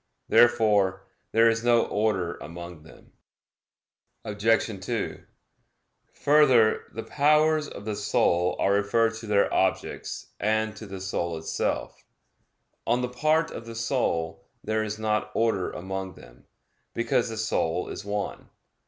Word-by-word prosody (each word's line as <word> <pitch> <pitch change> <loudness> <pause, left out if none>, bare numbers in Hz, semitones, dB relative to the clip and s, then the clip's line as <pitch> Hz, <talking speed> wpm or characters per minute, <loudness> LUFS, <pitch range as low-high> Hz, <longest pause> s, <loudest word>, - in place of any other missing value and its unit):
Therefore 105 -6 +4 0.3
there 115 +1 +5
is 115 0 +1
no 120 -1 +4
order 100 -5 0
among 85 0 -9
them. 80 - -17 1.1
Obj. 105 -1 0
2: - - -3 0.9
Further, 135 -7 +4
the 115 - -6
powers 150 +1 +3
of 100 - -10
the 110 -1 -2
soul 90 -2 +1
are 100 - +2
referred 110 +3 +2
to 115 0 -9
their 100 -1 +2
objects - - -2
and 110 0 0
to 110 0 -9
the 95 -1 -7
soul 85 -3 -2
itself. 80 - -3 0.8
On 120 +2 +2
the 125 - -1
part 155 +6 +1
of 115 - -8
the 115 - -8
soul, 115 -9 -1 0.2
there 110 0 0
is 110 0 -4
not 105 -1 -1
order 115 -5 +1
among 95 0 -5
them, - - -17 0.5
because 120 0 +1
the 110 - -6
soul 90 -6 -1
is - - -6
one. 100 0 -4
110 Hz, 135 wpm, -26 LUFS, 95-115 Hz, 1.1 s, there